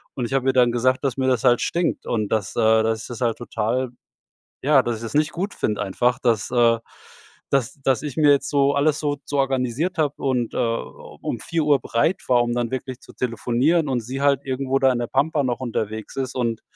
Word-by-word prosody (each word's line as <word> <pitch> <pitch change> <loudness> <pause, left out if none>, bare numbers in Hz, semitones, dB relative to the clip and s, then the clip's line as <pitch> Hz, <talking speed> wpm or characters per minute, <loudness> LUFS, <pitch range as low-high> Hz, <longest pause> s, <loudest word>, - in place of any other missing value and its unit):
und 125 - -2
ich 120 - -5
habe 135 -1 +1
ihr 130 - +2
dann 125 -2 +4
gesagt, 130 +3 +1
dass 135 -3 0
mir 130 - 0
das 125 -4 +1
halt 120 -1 +4
stinkt. 170 0 -1
Und 110 -3 -1
dass, 105 -3 -1
äh, 110 -1 +4
dass 110 0 0
ich - - -8
das 120 -1 -7
halt 115 -2 +1
total 120 +1 -2 0.7
ja, 140 -1 +5
dass 120 -1 -1
ich 115 - -10
das 115 - -6
nicht 150 +1 +2
gut 195 +4 -3
finde, 105 -1 -2
einfach, 120 +5 +1
dass, 115 -4 +1
äh, 115 -2 +4 0.7
dass 140 +1 0
das 135 +2 +1
ich 145 -4 -5
mir 150 -2 +5
jetzt 140 - +2
so 140 0 +2
alles 145 +1 +2
so 145 -1 -1
so 145 - -2
organisiert 135 +5 0
habe 150 -3 +1
und, 125 -4 -1
äh, - - -4
um 115 0 -4
4:00 150 0 +1
bereit 160 +10 0
war, 120 -1 +4
um 120 0 -1
dann 120 -1 -1
wirklich 130 -1 -5
zu - - -14
telefonieren, 125 +6 0
und 125 -3 0
sie 130 +4 -5
halt 140 -2 +3
irgendwo 135 0 -1
da 135 -1 +4
in 125 - -1
der 120 - -2
Pampa 145 +4 +1
noch 125 -1 -1
unterwegs 110 -3 -4
ist, 135 -1 -3
und 115 -3 -1
130 Hz, 225 wpm, -22 LUFS, 120-140 Hz, 0.7 s, ja